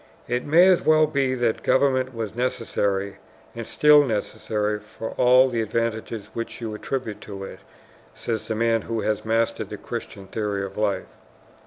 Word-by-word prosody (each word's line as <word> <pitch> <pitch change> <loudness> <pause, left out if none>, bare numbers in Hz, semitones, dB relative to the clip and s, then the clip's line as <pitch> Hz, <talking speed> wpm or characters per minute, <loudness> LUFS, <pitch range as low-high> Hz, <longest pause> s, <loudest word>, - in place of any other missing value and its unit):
"It 120 +1 -1
may 175 +5 +7
well 155 0 +5
be 140 -4 0
that 120 -3 0
government 130 -1 +2
was 115 -4 -5
necessary 100 -5 -1 0.4
and 115 -1 -7
is - - -12
still 150 -1 +6
necessary 105 -2 -2
for 105 +1 -8
all 125 +1 +5
the 120 -3 -1
advantages 110 -1 -3
which 115 - -5
you 115 -2 -4
attribute 110 0 -4
to 100 -2 -8
it," - - -9 0.6
says 110 -2 -4
the 110 - -2
man 115 0 +2
who 115 +1 -3
has 110 -1 -1
mastered 115 +1 0
the - - -6
Christian 100 - -7
theory 100 -1 -2
of 95 0 -9
life. 105 -2 0
115 Hz, 165 wpm, -24 LUFS, 105-130 Hz, 0.6 s, may